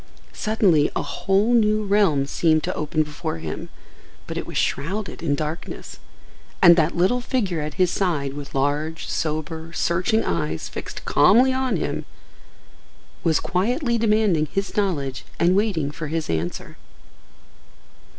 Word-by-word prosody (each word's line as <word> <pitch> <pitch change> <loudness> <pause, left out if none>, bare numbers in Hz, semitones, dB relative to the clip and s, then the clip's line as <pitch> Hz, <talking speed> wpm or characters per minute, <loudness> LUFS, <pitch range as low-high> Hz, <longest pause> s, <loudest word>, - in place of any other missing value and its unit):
Suddenly 195 -9 +2
a - - 0
whole 200 +5 +1
new 215 -2 +3
realm 195 -9 +3
seemed 155 +2 +2
to - - -2
open 155 +1 0
before 150 - -5
him, 80 -1 -6 0.6
but - - -6
it - - -4
was - - -5
shrouded 190 +8 -2
in 150 -4 +1
darkness. 155 +3 -6 0.6
And 175 -2 +8
that 165 +1 +1
little 190 +8 +2
figure 205 - -1
at 150 +1 -5
his 180 -2 +2
side 155 -9 -1
with 145 -1 -8
large, 145 +4 -1
sober, 160 +1 -3
searching 185 +6 +1
eyes 80 -2 -2
fixed - - -7
calmly 255 +5 +5
on 260 -1 0
him - - -3 1.2
was 160 -3 +3
quietly 235 - 0
demanding 210 -8 +2
his 195 +6 -3
knowledge 145 -11 -1 0.2
and 175 +2 +4
waiting 190 -9 0
for 155 0 -6
his 160 0 -2
answer. 80 +2 -4
170 Hz, 140 wpm, -23 LUFS, 150-210 Hz, 1.2 s, And